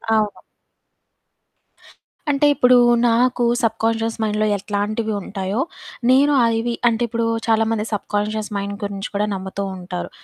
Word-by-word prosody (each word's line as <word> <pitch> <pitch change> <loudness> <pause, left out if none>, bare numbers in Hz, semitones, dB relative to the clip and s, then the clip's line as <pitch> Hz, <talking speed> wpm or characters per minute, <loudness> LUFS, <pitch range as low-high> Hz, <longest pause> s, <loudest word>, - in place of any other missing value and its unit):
అవును. 210 -1 -1 1.9
అంటే 280 +1 +2
ఇప్పుడు 250 -2 +4 0.3
నాకు 245 +1 +2 0.2
సబ్‌కాన్షియస్ 225 0 0
మైండ్‌లో 215 0 0
ఎట్లాంటివి 210 +2 -2
ఉంటాయో, 195 +4 -3 0.5
నేను 280 +3 +5
అవి 230 +1 +1
అంటే 230 0 +1
ఇప్పుడు 230 0 -1 0.2
చాలా 225 0 +3
మంది 215 -1 -1
సబ్‌కాన్షియస్ 210 +1 -2
మైండ్‌ 200 0 -3
గురించి 200 0 -4
కూడా 205 +1 +1
నమ్ముతూ 190 +1 -5
ఉంటారు. 180 0 -6
220 Hz, 115 wpm, -20 LUFS, 205-230 Hz, 1.9 s, నేను